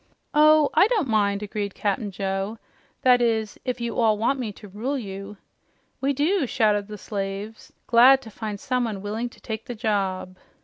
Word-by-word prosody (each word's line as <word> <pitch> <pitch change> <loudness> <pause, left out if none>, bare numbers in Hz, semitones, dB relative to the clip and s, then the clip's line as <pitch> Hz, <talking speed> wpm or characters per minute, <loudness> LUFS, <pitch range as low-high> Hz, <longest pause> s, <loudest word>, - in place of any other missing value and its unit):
"Oh, 305 -1 +5
I 390 - +6
don't 430 - +1
mind," 205 -2 +1
agreed 205 -1 -4
Cap'n 205 +1 -1
Joe. 195 +2 -3 0.5
"That 250 -1 +5
is, 220 -3 0
if 250 -1 -2
you 235 0 -3
all 220 -2 +3
want 250 +5 +1
me 230 -4 -3
to 205 - -13
rule 230 +9 -3
you." 200 -2 -7 0.6
"We 275 +1 +2
do!" 295 +3 +1
shouted 210 -4 +1
the 210 0 -8
slaves, 200 +2 -5
glad 255 +3 +7
to 220 - -11
find 210 -1 -5
someone 235 -6 -2
willing 220 +4 -3
to - - -19
take 220 -1 -6
the 245 - -5
job. 195 -4 -2
220 Hz, 175 wpm, -24 LUFS, 200-250 Hz, 0.6 s, glad